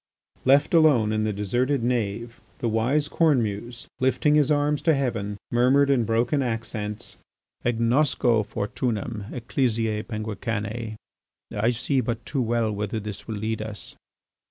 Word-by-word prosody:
Left 140 +5 +4
alone 140 -10 +5
in 110 0 0
the 110 - 0
deserted 120 +6 0
nave, 115 -1 -2 0.2
the 120 - -2
wise 125 +7 +1
Cornemuse, 120 -7 0
lifting 130 +3 +2
his 150 -2 +4
arms 145 0 +2
to 160 0 +3
heaven, 115 -7 -2
murmured 130 +4 +4
in 125 -4 +2
broken 120 +6 +1
accents: 110 -3 -4 0.5
"Agnosco 120 0 +2
fortunam 105 0 -3
ecclesiæ 115 -3 -1
penguicanæ! 110 0 -4 0.6
I 105 +3 +2
see 130 +3 0
but 115 -1 -3
too 140 - -1
well 115 -2 +1
whither 105 +1 -3
this 105 -1 -7
will 110 - -3
lead 110 +1 -2
us." 110 -2 -6
115 Hz, 130 wpm, -25 LUFS, 110-130 Hz, 0.6 s, alone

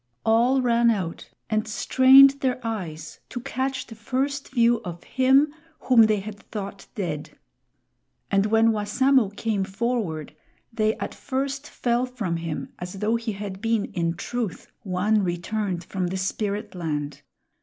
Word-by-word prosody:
All 245 +4 +3
ran 235 -1 +4
out 185 -7 -2 0.2
and 215 0 0
strained 265 +5 +6
their 255 -2 0
eyes 165 -9 -5
to 245 - -5
catch 265 +1 -3
the - - -11
first 270 +5 -2
view 235 -2 +3
of 175 -1 -7
him 270 +3 +3 0.3
whom 230 -4 +6
they 210 -2 +1
had 205 0 -8
thought 200 -2 -7
dead. 165 -8 -4 0.9
And 195 +1 +3
when 225 +1 +4
Wassamo 225 +3 +2
came 215 -4 0
forward, 190 - -2 0.4
they 215 -1 +1
at - - -5
first 275 +1 -3
fell 240 +1 0
from 220 -9 -3
him 165 -2 -5
as 180 0 -6
though 210 +3 0
he 230 -1 -2
had 195 -1 -6
been 225 -2 0
in 170 -1 -1
truth 230 0 -4
one 205 +1 +1
returned 180 +1 -2
from 185 0 -3
the 190 +2 -3
Spiritland. 185 -8 -3
215 Hz, 145 wpm, -25 LUFS, 190-245 Hz, 0.9 s, strained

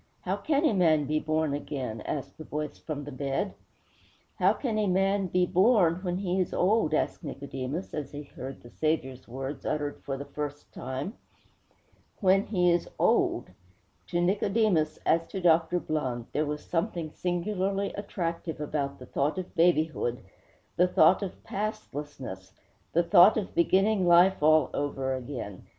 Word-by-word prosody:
How 190 +1 -1
can 285 +8 +1
a 270 - +3
man 160 -6 +3
be 155 +2 0
born 155 -1 0
again?' 130 -6 -4
asked 145 0 -4
the - - -6
voice 150 0 -5
from 150 -2 -5
the 145 - -7
bed. 140 +8 -2 0.9
'How - - +5
can 225 -6 -2
a 210 - +1
man 195 +1 +2
be 180 0 +2
born 185 -2 +4
when 180 -1 -3
he 190 -1 -1
is 180 - -1
old?' 185 -5 +2
asked - - -1
Nicodemus, 140 +2 -5
as 145 -3 -4
he 145 0 -6
heard 135 -1 -9
the 120 - -13
Saviour's 135 -5 -2
words 135 +4 -6
uttered 145 -1 -2
for 135 -1 -3
the 140 - -6
first 145 0 -6
time. 130 - -4 1.1
'When 195 0 +3
he 180 -4 +3
is 170 0 0
old!' - - +2 0.6
To 175 - -1
Nicodemus, 195 -2 +2
as 165 +1 +2
to 195 - -5
Dr. 170 0 +3
Blund, 130 -8 -2
there 150 0 0
was 150 0 -4
something 170 -2 -2
singularly 195 +3 -1
attractive 170 -5 -4
about 145 -2 -2
the 125 - -11
thought 140 +6 -1
of 185 -1 -5
babyhood, 160 -7 +2 0.6
the 180 - +5
thought 180 +2 +5
of 195 -2 -6
pastlessness, 145 - -5 0.4
the 170 - +3
thought 180 +4 +7
of 205 -3 -3
beginning 190 +2 +3
life 175 +2 +6
all 155 +1 +4
over 135 -2 -1
again. 125 -7 -6
165 Hz, 160 wpm, -28 LUFS, 145-185 Hz, 1.1 s, thought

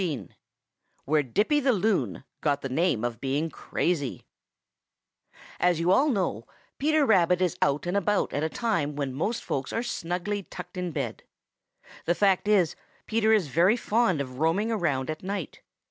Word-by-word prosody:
XV 160 -8 -3 0.8
WHERE 150 +2 +3
DIPPY 210 - +1
THE 265 -2 +3
LOON 185 - 0 0.2
GOT 145 -2 +1
THE 135 - -3
NAME 145 -4 +1
OF 120 -1 -3
BEING 145 +4 -1
CRAZY 150 -7 -2 1.3
As 175 -2 +2
you 170 +2 +2
all 275 +10 +4
know, 180 - -1 0.3
Peter 305 +1 +3
Rabbit 180 -6 +4
is 180 -3 +1
out 140 +3 +1
and 175 +2 -1
about 200 +1 +1
at 145 - -1
a 160 - 0
time 170 -10 -1
when 140 -3 -2
most 205 - -2
folks 135 -1 -3
are 230 - -1
snugly 190 -2 -3
tucked 180 0 -10
in 180 -1 -2
bed. - - -4 0.8
The 175 - +2
fact 195 0 +2
is, 195 -7 +3 0.3
Peter 220 0 +2
is 205 -9 +3
very 180 - +4
fond 225 -7 +1
of 130 -1 -7
roaming 180 +8 +1
around 155 -10 0
at 155 - -7
night. 190 -4 -5
180 Hz, 165 wpm, -27 LUFS, 145-210 Hz, 1.3 s, all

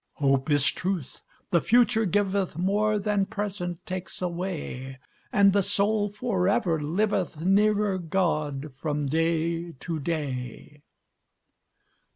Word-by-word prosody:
Hope 135 0 +1
is 145 -2 +4
truth, 180 -7 -4 0.3
the 170 - +4
future 235 +1 +3
giveth 195 -2 0
More 210 +4 +1
than 205 -1 0
present 190 -4 -4
takes 185 0 -5
away, 170 -7 -4 0.3
And 200 -1 +5
the 200 - +4
soul 205 +2 +2
forever 195 -6 0
liveth 180 +2 -1
Nearer 205 +1 +2
God 155 -5 -1
from 150 -1 -2
day 165 +3 0
to 160 +3 -5
day." 145 -2 -4
180 Hz, 110 wpm, -26 LUFS, 155-200 Hz, 0.3 s, And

